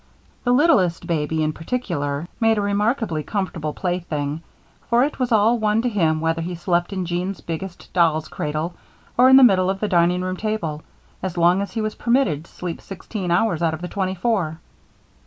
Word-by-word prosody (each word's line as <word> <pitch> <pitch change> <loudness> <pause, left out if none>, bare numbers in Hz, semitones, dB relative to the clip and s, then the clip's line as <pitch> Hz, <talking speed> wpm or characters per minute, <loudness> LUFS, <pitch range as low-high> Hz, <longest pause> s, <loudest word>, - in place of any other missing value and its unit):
The 245 - +2
littlest 250 - +3
baby, 160 -1 0
in 155 0 0
particular, 160 - -3
made 225 -1 +3
a - - +1
remarkably 205 - 0
comfortable 175 -4 -3
plaything, 160 -4 -3 0.5
for 235 +1 +4
it 290 0 -2
was 250 -1 0
all 225 +2 +4
one 215 +1 +1
to 250 - +1
him 165 -8 +1
whether 165 0 0
he 175 +2 -4
slept 175 +1 0
in 190 -2 -2
Jean's 175 +2 -3
biggest 170 +2 -7
doll's 160 -3 +2
cradle, 155 +3 -3 0.4
or 255 +1 +6
in 265 - +8
the 270 - +8
middle 190 -6 +5
of 195 0 -1
the 210 - -1
dining 180 -1 +2
room 185 0 -3
table, 180 -9 -3 0.4
as 185 -1 -4
long 175 +3 +4
as 200 - -5
he 225 - -1
was 215 0 -2
permitted 235 - +1
to - - -21
sleep 175 -2 -6
sixteen 195 -1 -6
hours 175 -1 +2
out 165 -1 +1
of 160 - -11
the 180 - -4
twenty 190 0 -2
four. 180 -5 0
180 Hz, 195 wpm, -22 LUFS, 165-215 Hz, 0.5 s, in